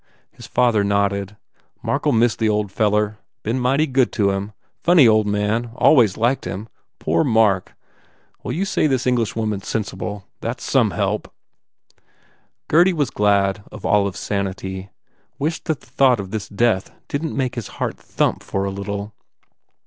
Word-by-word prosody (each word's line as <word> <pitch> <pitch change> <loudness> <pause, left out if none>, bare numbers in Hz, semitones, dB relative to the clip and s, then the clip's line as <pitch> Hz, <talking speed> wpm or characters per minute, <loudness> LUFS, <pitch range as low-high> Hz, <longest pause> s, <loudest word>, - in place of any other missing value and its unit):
His - - -12
father 120 -4 +2
nodded, 100 0 0 0.5
"Mark 140 +2 -1
ll - - +4
miss 115 -1 +3
the 110 -1 +1
old 105 -2 0
feller. 105 0 +1 0.2
Been 115 +4 -1
mighty 135 +5 +2
good 130 -3 +2
to 100 -3 +2
him. 100 +2 -4 0.3
Funny 170 -7 +6
old 110 -1 +4
man. 105 +3 0
Always 120 -11 +4
liked 120 +4 +1
him. 105 +4 -5 0.3
Poor 80 +2 +1
Mark! 110 -5 +2 0.7
Well, - - -4
you 185 +6 -1
say 170 - +1
this 130 -3 0
Englishwoman 115 -4 0
s - - -12
sen 110 - 0
sible. 105 -1 -6 0.2
That - - -3
s - - -12
some - - +3
help." - - -2 1.4
Gurdy 175 +4 +5
was 145 -7 0
glad 100 -1 +2
of - - -9
Olive 100 -3 +2
s - - -7
sanity, 95 -1 -3 0.5
wished 155 +3 -2
that 160 -4 -2
the - - -20
thought 130 -2 +3
of 95 -1 -6
this 110 -3 -4
death 105 -2 +1 0.2
didn 155 +3 -2
t - - -6
make 130 -2 -1
his 120 -4 -5
heart - - -2
thump - - -1
for 95 0 -2
a 100 - -2
little. 100 +2 -5
110 Hz, 170 wpm, -21 LUFS, 100-125 Hz, 1.4 s, Funny